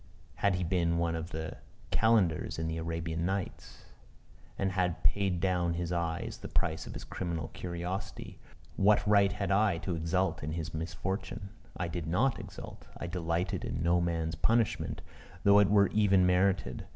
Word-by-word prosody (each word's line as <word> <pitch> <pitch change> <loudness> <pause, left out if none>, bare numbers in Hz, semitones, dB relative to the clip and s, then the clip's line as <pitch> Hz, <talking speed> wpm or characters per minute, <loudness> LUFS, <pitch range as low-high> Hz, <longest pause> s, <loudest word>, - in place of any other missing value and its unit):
Had 100 -2 +2
he 90 - -1
been 85 -1 +1
one 85 0 +1
of 80 +1 -4
the 80 -1 -5 0.3
Calendars 105 -8 +2
in 80 0 -2
the 80 0 -2
Arabian 80 0 -3
Nights, 95 0 -4 0.7
and 95 -1 0
had 90 -4 0
paid 90 +3 +2
down 90 -2 +1
his 85 0 -2
eye 85 -1 -1
as - - -7
the - - -7
price 80 - -1
of - - -8
his - - -6
criminal 85 -3 -4
curiosity, 90 +2 -5 0.4
what 105 +2 +4
right 100 -1 +5
had 100 -1 -2
I 100 -3 +3
to 90 - -1
exult 85 +2 0
in 75 +2 -3
his 80 -1 -4
misfortune? 95 +6 -4 0.3
I 85 - -1
did 85 -1 -4
not 115 +10 +2
exult: - - -9
I - - -5
delighted 85 0 -1
in - - -3
no 85 +1 +3
man's 85 -2 -1
punishment, 115 +7 +1 0.4
though 100 0 +7
it 100 - +5
were 100 -1 +5
even 100 -3 +4
merited. 90 -6 +1
90 Hz, 170 wpm, -31 LUFS, 85-95 Hz, 0.7 s, though